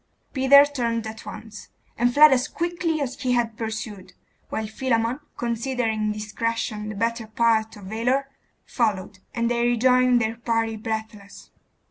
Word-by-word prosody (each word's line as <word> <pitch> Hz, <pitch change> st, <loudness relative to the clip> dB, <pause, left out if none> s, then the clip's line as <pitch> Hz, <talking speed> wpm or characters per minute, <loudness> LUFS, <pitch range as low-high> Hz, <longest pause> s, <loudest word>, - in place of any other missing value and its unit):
Peter 280 Hz, +1 st, +7 dB
turned 235 Hz, -5 st, -2 dB
at 220 Hz, 0 st, -8 dB
once, 215 Hz, -1 st, -9 dB, 0.3 s
and 245 Hz, +1 st, +2 dB
fled 300 Hz, +3 st, +8 dB
as 250 Hz, -1 st, +1 dB
quickly 340 Hz, -2 st, -2 dB
as 275 Hz, 0 st, -4 dB
he 255 Hz, -2 st, +1 dB
had 235 Hz, -2 st, 0 dB
pursued; 220 Hz, -4 st, -6 dB, 0.4 s
while 220 Hz, -, -3 dB
Philammon, 230 Hz, +2 st, -1 dB, 0.2 s
considering 230 Hz, -2 st, -1 dB
discretion 215 Hz, 0 st, -3 dB
the 215 Hz, -, -6 dB
better 230 Hz, +1 st, -1 dB
part 220 Hz, 0 st, +1 dB
of 205 Hz, -, -12 dB
valour, 240 Hz, +7 st, 0 dB, 0.4 s
followed, 210 Hz, -4 st, -1 dB, 0.2 s
and 235 Hz, -1 st, +1 dB
they 235 Hz, 0 st, +1 dB
rejoined 250 Hz, +1 st, +4 dB
their 225 Hz, 0 st, -1 dB
party 225 Hz, -1 st, -1 dB
breathless. 220 Hz, -2 st, -6 dB
230 Hz, 140 wpm, -24 LUFS, 220-250 Hz, 0.4 s, fled